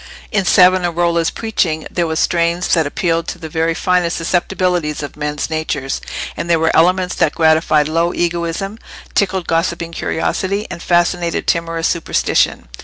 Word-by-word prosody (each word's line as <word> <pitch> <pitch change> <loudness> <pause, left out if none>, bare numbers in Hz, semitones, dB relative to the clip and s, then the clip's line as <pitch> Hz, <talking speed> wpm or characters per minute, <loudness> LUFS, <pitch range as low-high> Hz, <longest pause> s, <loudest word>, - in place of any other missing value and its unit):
In 200 -3 +1
Savonarola's 175 -2 +3
preaching 170 -8 -1
there 175 -2 0
were 160 - -2
strains 170 +2 +1
that 160 -4 +3
appealed 165 +2 -1
to - - -4
the 160 -2 -8
very 165 +1 0
finest 180 -1 +1
susceptibilities 175 -2 -1
of 145 - -7
men's 150 0 -3
natures, 155 -4 -3 0.3
and 170 - -5
there 170 - +4
were 160 0 +1
elements 180 +2 +3
that 150 - +1
gratified 160 -2 +3
low 165 +2 +1
egoism, 175 +5 -2 0.3
tickled 190 -3 0
gossiping 170 0 -1
curiosity, 190 +5 -2
and 170 - -7
fascinated 175 0 +1
timorous 165 0 0
superstition. 165 - 0
170 Hz, 145 wpm, -17 LUFS, 160-180 Hz, 0.3 s, there